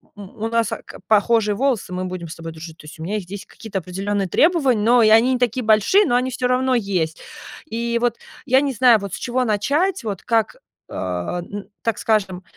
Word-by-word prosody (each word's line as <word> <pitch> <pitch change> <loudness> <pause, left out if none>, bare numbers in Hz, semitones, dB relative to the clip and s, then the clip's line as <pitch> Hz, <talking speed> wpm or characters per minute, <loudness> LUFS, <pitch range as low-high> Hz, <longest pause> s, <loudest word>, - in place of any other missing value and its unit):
У 205 +2 -6
нас, 230 -1 0
э, - - -4
к - - -12
похожие 215 -1 +3
волосы, 250 -7 -1
мы 185 +1 -3
будем 180 -2 -6
с - - -7
тобой 165 0 -8
дружить". 160 0 -10
То - - -15
есть 155 - -12
у - - -6
меня 200 +5 -3
их 195 - -6
здесь 195 +2 -8
какие-то 210 -4 -6
определенные 195 +2 -3
требования, 275 - +2
но 240 +2 +5
и 215 - +5
они 230 +4 +5
не 250 - -1
такие 245 0 0
большие, 220 - +4
но 240 - +1
они 250 +1 +1
всё 250 +1 -1
равно 255 +1 +1
есть. 185 -8 -1 0.5
И 235 -1 -2
вот 240 -1 0 0.3
я 260 0 +4
не 280 -2 -1
знаю, 240 -1 +5
вот 200 -2 -7
с - - -3
чего 255 +1 -1
начать, 285 - 0
вот 200 -4 -5
как, 230 - 0 0.3
а, 90 - -3
н 200 +3 -8
так 225 -2 0
скажем, 190 -4 0
220 Hz, 220 wpm, -21 LUFS, 190-245 Hz, 0.5 s, но